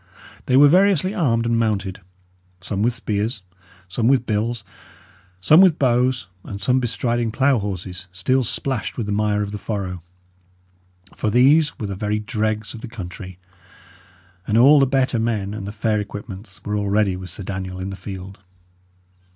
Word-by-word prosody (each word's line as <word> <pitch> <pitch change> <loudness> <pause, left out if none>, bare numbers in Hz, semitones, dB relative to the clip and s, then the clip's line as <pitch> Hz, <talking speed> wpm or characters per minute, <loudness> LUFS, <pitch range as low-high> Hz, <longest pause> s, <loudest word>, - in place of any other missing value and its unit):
They 130 - +4
were 145 +1 +8
variously 185 +2 +3
armed 120 - +1
and 115 0 +1
mounted; 100 -4 -1 0.6
some 95 +2 -3
with 120 +2 +1
spears, 105 -1 -2 0.4
some 110 +5 -1
with 130 -2 +3
bills, 110 +1 -1 0.8
some 150 - +6
with 185 -5 +5
bows, 125 -1 +2 0.2
and 100 - -7
some 125 +6 +2
bestriding 120 -1 -1
plough 135 +1 +2
horses, 95 -2 -5
still 130 +9 +1
splashed 130 +1 -3
with 115 - -2
the 105 - -3
mire 105 0 +1
of 100 - -5
the 105 - -5
furrow; 95 -5 -4 1.1
for 110 - -1
these 145 +7 +4
were 110 - -4
the 100 - -4
very 105 +2 -1
dregs 110 0 -2
of 115 - -9
the 125 - -6
country, 95 -4 -8 1.1
and 105 - +2
all 140 +5 +7
the 135 - +4
better 130 -2 +1
men 110 -3 -1
and 105 -2 -6
the - - -4
fair 110 0 0
equipments 100 0 -8
were 105 - -2
already 100 -1 +1
with 90 0 -8
Sir 95 - -7
Daniel 95 -1 -5
in 95 +1 -4
the - - -5
field. 95 -1 -8
110 Hz, 165 wpm, -21 LUFS, 100-125 Hz, 1.1 s, were